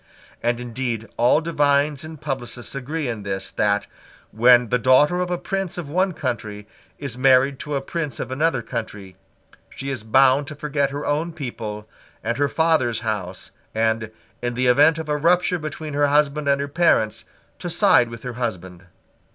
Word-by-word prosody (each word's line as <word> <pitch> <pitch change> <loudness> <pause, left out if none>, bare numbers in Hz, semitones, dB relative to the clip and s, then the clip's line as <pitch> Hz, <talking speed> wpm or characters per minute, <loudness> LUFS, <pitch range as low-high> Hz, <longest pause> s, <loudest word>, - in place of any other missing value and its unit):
And 120 0 0
indeed 120 -2 -4
all 125 +6 +3
divines 145 -3 +1
and 155 -1 -9
publicists 130 -4 -5
agree 140 +3 -3
in 115 -3 -4
this, 95 -1 -4
that, 105 0 +1 0.5
when 120 +1 +5
the 125 - +2
daughter 130 +8 +4
of 180 -1 -1
a 180 - -1
prince 195 0 -3
of 165 -5 -5
one 185 +2 +1
country 110 -7 -4 0.3
is 130 -4 -5
married 135 0 +4
to 150 -1 -4
a 135 - -2
prince 150 -2 -4
of - - -4
another 135 -2 0
country, 100 -6 -6 0.5
she 140 +1 -5
is 130 -5 -3
bound 135 +5 +4
to 150 - -7
forget 145 -1 -1
her 145 +1 -5
own 155 +3 -1
people 110 -8 -6 0.4
and 115 +1 -1
her 145 0 +1
father's 150 -9 +1
house, 95 -5 -4 0.2
and, 110 0 0 0.3
in 120 0 -2
the 130 +1 0
event 145 +6 +5
of 160 -1 -5
a 150 - 0
rupture 175 +3 +2
between 155 0 -6
her 145 0 +3
husband 145 0 +1
and 140 0 +3
her 140 - -2
parents, 145 -8 +1 0.3
to - - -4
side 120 -1 +4
with 115 0 -10
her 125 -1 -5
husband. 95 -7 -5
135 Hz, 175 wpm, -22 LUFS, 115-150 Hz, 0.5 s, when